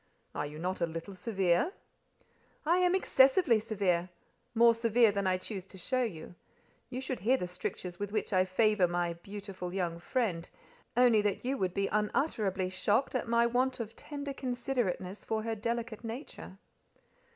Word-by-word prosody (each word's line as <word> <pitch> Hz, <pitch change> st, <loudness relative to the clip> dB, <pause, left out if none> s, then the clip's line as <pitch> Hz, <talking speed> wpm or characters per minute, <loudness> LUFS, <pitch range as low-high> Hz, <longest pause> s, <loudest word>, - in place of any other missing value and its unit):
"Are 145 Hz, -, -2 dB
you 150 Hz, +1 st, -9 dB
not 180 Hz, +3 st, -3 dB
a 170 Hz, -, +2 dB
little 165 Hz, +4 st, -6 dB
severe?" 190 Hz, -, +1 dB, 0.9 s
"I 340 Hz, +3 st, +4 dB
am 360 Hz, 0 st, +3 dB
excessively 270 Hz, -6 st, +5 dB
severe—more 200 Hz, +3 st, +1 dB
severe 230 Hz, -1 st, +4 dB
than 200 Hz, -1 st, -1 dB
I 185 Hz, 0 st, +2 dB
choose 190 Hz, 0 st, -6 dB
to 190 Hz, -, -12 dB
show 255 Hz, +8 st, 0 dB
you. 180 Hz, -9 st, -4 dB, 0.6 s
You 255 Hz, 0 st, -4 dB
should 260 Hz, -1 st, -3 dB
hear 245 Hz, +7 st, +3 dB
the 180 Hz, -, -3 dB
strictures 180 Hz, 0 st, -5 dB
with 205 Hz, 0 st, -3 dB
which 215 Hz, -1 st, -2 dB
I 185 Hz, 0 st, +5 dB
favour 190 Hz, 0 st, +3 dB
my 175 Hz, 0 st, -1 dB
'beautiful 195 Hz, 0 st, -7 dB
young 170 Hz, -3 st, -1 dB
friend,' 180 Hz, -5 st, -1 dB, 0.5 s
only 240 Hz, -4 st, +6 dB
that 205 Hz, +2 st, -1 dB
you 265 Hz, +2 st, +1 dB
would 185 Hz, -2 st, -1 dB
be 195 Hz, -, +1 dB
unutterably 210 Hz, -3 st, 0 dB
shocked 215 Hz, +7 st, +1 dB
at 255 Hz, -, -1 dB
my 235 Hz, 0 st, +4 dB
want 250 Hz, +2 st, +1 dB
of 225 Hz, -1 st, -5 dB
tender 285 Hz, -1 st, -6 dB
considerateness 245 Hz, -7 st, -2 dB
for 220 Hz, -1 st, -2 dB
her 225 Hz, 0 st, -1 dB
delicate 230 Hz, +1 st, -3 dB
nature." 225 Hz, -4 st, -7 dB
210 Hz, 160 wpm, -31 LUFS, 185-240 Hz, 0.9 s, only